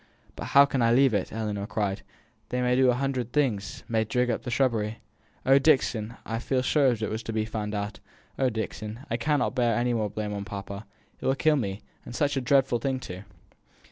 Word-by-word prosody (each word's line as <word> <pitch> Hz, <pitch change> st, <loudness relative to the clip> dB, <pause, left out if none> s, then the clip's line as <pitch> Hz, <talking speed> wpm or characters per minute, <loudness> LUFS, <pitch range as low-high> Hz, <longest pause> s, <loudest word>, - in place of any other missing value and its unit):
"But -, -, -6 dB
how 140 Hz, 0 st, +7 dB
can 135 Hz, -2 st, -1 dB
I 115 Hz, 0 st, +4 dB
leave 130 Hz, 0 st, +5 dB
it!" 100 Hz, -3 st, -1 dB
Ellinor 105 Hz, -2 st, -3 dB
cried. 100 Hz, -2 st, -2 dB, 0.5 s
"They 125 Hz, -, -1 dB
may 125 Hz, 0 st, +3 dB
do 130 Hz, 0 st, +5 dB
a 125 Hz, -, +3 dB
hundred 130 Hz, -2 st, -2 dB
things 120 Hz, -9 st, -1 dB
may 110 Hz, -2 st, +1 dB
dig 125 Hz, +2 st, +1 dB
up 115 Hz, -, -2 dB
the 125 Hz, -, -6 dB
shrubbery. 115 Hz, -4 st, +1 dB, 0.5 s
Oh! 135 Hz, +1 st, +6 dB
Dixon, 125 Hz, -6 st, +2 dB
I 115 Hz, 0 st, -2 dB
feel 130 Hz, +2 st, -1 dB
as -, -, -5 dB
if -, -, +1 dB, 0.3 s
it 110 Hz, -, -1 dB
was 110 Hz, +1 st, -3 dB
sure -, -, -18 dB
to -, -, -3 dB
be 110 Hz, 0 st, 0 dB
found 105 Hz, -1 st, -4 dB
out! 100 Hz, 0 st, -4 dB, 0.4 s
Oh! 130 Hz, -1 st, +3 dB
Dixon, 110 Hz, 0 st, -5 dB
I -, -, +1 dB
cannot 150 Hz, -3 st, +1 dB
bear 120 Hz, -3 st, +2 dB
any 120 Hz, 0 st, +1 dB
more 110 Hz, -3 st, 0 dB
blame 105 Hz, 0 st, -4 dB
on 100 Hz, -1 st, -3 dB
papa 100 Hz, +1 st, -7 dB, 0.3 s
it -, -, -8 dB
will 135 Hz, -, +3 dB
kill 155 Hz, +2 st, +3 dB
me 100 Hz, -7 st, -3 dB, 0.2 s
and 120 Hz, -, -9 dB
such 145 Hz, 0 st, +1 dB
a 135 Hz, -, 0 dB
dreadful 130 Hz, -1 st, +3 dB
thing, 130 Hz, +2 st, -1 dB
too!" 90 Hz, -6 st, -7 dB
115 Hz, 225 wpm, -27 LUFS, 105-130 Hz, 0.5 s, how